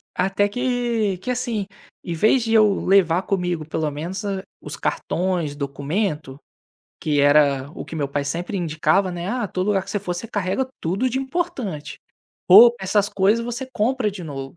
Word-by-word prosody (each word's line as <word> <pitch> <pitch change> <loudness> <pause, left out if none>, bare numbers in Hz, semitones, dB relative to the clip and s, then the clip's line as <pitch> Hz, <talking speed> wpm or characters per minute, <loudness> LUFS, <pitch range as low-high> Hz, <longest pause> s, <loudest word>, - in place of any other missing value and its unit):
Até 195 +2 +1
que 235 -4 -1
que 250 - -3
assim, 235 -5 -2 0.4
em 170 - -4
vez 220 +8 +3
de 225 -1 -1
eu 210 -3 +4
levar 185 -2 +4
comigo 180 -5 -2
pelo 160 -1 -1
menos 170 +8 -5 0.4
os - - -6
cartões, 175 -5 -2
documento, 145 +1 -3 0.6
que 145 -2 +1
era 145 -1 +3
o - - -7
que - - -9
meu 145 -3 -2
pai 140 0 -2
sempre 170 +7 -3
indicava, 170 +2 +1
né, 175 +2 -5
"Ah, 240 -1 -1
todo 185 +2 -2
lugar 195 -2 +1
que - - -9
você 205 - -1
for 180 -3 -3
você 205 +6 -5
carrega 205 +4 -1
tudo 195 +10 0
de 260 +2 -2
importante", 260 - -4 0.5
ou 230 +6 +9
essas 200 +1 +1
coisas 210 +4 +2
você 240 +2 -4
compra 225 0 0
de 185 -3 -8
novo. 135 0 -7
190 Hz, 175 wpm, -22 LUFS, 160-220 Hz, 0.6 s, ou